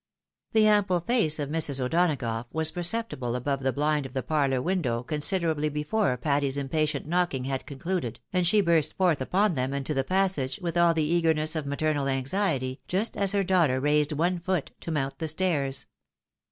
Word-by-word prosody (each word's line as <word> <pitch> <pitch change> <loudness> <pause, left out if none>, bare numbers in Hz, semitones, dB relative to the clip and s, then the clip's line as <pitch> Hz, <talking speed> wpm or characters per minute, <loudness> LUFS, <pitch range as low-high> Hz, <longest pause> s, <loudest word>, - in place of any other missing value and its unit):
The 220 -1 +5
ample 205 -4 +3
face 175 -7 +1
of 145 -2 -3
Mrs. 150 -3 0
O'Donagough 125 -5 0
was 160 0 +2
perceptible 175 - -2
above 135 +2 -2
the 135 0 +1
bhnd 150 0 0
of 130 - -16
the 130 - -2
parlour 140 -4 +1
window 130 -7 -1
considerably 155 +1 0
before 150 +1 0
Patty's 140 0 0
im 140 -1 -3
patient 155 -2 0
knocking 170 -5 0
had 135 0 -3
concluded, 140 - -3
and 180 -2 +2
she 210 +4 +4
burst 170 -5 +1
forth 175 -7 +2
upon 190 +8 +2
them 130 -1 -2
into 140 +2 -2
the 135 -2 0
passage 185 -5 0
with 175 -3 -3
all 170 -1 +4
the 160 - +1
eagerness 160 -1 +1
of 155 -3 -3
maternal 145 0 0
anxiety, 135 -1 -1
just 200 +5 0
as 200 -1 +1
her 200 -1 +2
daughter 170 -9 +2
raised 150 +2 +2
one 175 +4 0
foot 175 -3 -2
to - - -7
mount 140 -4 -2
the 160 - -2
stairs. 150 -5 0
155 Hz, 180 wpm, -27 LUFS, 135-180 Hz, -, The